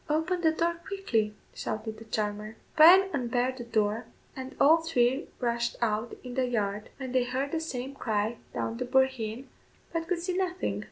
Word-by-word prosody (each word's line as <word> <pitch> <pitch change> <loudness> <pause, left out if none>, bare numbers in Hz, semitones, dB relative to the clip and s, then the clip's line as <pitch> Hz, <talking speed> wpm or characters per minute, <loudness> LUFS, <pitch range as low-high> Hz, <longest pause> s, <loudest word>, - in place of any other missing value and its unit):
"Open 320 +4 +1
the 325 - +5
door 335 +1 0
quickly," 225 - 0 0.2
shouted 220 0 -4
the 225 - -11
charmer. 210 0 -3 0.2
Bryan 360 +5 +9
unbarred 250 -1 0
the 240 - -5
door, 220 0 0 0.3
and 260 0 -7
all 310 +4 +7
three 275 -5 +1
rushed 235 -1 0
out 225 0 -1
in 250 -1 -7
the 255 0 +1
yard, 210 -3 -1
when 260 -2 -5
they 255 -1 +3
heard 260 +3 -2
the 325 - 0
same 275 -4 -4
cry 220 -3 -1
down 225 - -3
the 250 - -2
boreheen, 260 -2 +1 0.5
but 330 0 -2
could 360 0 +1
see 355 +2 -2
nothing. 370 -1 -1
255 Hz, 175 wpm, -29 LUFS, 225-320 Hz, 0.5 s, Bryan